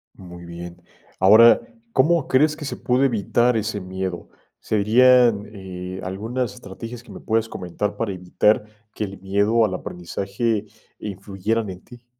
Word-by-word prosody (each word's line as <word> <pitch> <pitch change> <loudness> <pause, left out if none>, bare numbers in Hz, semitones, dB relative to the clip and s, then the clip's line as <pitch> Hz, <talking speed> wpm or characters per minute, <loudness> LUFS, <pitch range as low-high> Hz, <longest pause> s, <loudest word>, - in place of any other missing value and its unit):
Muy 90 -2 -11
bien. 85 +1 -9 0.4
Ahora, 110 - +7 0.3
¿cómo 155 +2 +3
crees 150 +4 +3
que 155 - -7
se - - -4
pudo 125 +1 +1
evitar 120 +1 +2
ese 105 -1 -2
miedo?, 95 -1 -5 0.3
serían, 115 0 +4
eh, 95 -2 -7
algunas 115 +7 -3
estrategias 115 +1 -9
que - - -15
me - - -9
puedes 115 0 0
comentar 95 +3 -4
para 110 -3 -2
evitar 90 +4 +1 0.3
que 105 - -3
el 100 0 -9
miedo 100 +4 +2
al 100 - -2
aprendizaje 100 +5 -3 0.3
influyeran 100 +2 -3
en 90 0 -10
ti. 120 0 -15
105 Hz, 145 wpm, -22 LUFS, 95-120 Hz, 0.4 s, Ahora